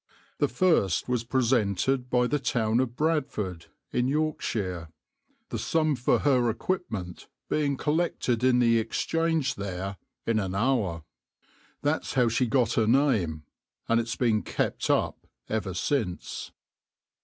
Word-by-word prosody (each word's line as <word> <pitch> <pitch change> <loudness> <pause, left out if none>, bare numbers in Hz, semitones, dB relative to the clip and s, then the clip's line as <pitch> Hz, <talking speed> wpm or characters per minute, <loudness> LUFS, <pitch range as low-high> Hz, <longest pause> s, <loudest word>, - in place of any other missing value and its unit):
The - - +3
first 125 - +2
was 125 -2 0
presented 125 0 +1
by 125 0 +3
the 145 +4 0
town 115 -3 +1
of 125 -2 -1
Bradford 125 - -1 0.2
in 125 - +1
Yorkshire, 110 - -1 0.6
the - - -3
sum 155 -2 +1
for 125 -1 +2
her 125 -4 +3
equipment 110 - -3 0.2
being 140 -3 +1
collected 150 -7 0
in 130 -1 +4
the 115 -2 +4
Exchange 160 +4 0
there 95 -2 -5 0.3
in 115 -1 +2
an 95 -2 -2
hour. 100 - 0 0.8
That's 145 0 -1
how 125 -3 +4
she 120 +3 +1
got 120 -2 +2
her 110 -2 +2
name, 110 - +2 0.4
and 115 - +3
it's 115 0 -4
been 115 -4 +2
kept - - -2
up - - 0 0.2
ever 100 -4 -2
since. 105 -4 -2
120 Hz, 130 wpm, -27 LUFS, 105-135 Hz, 0.8 s, in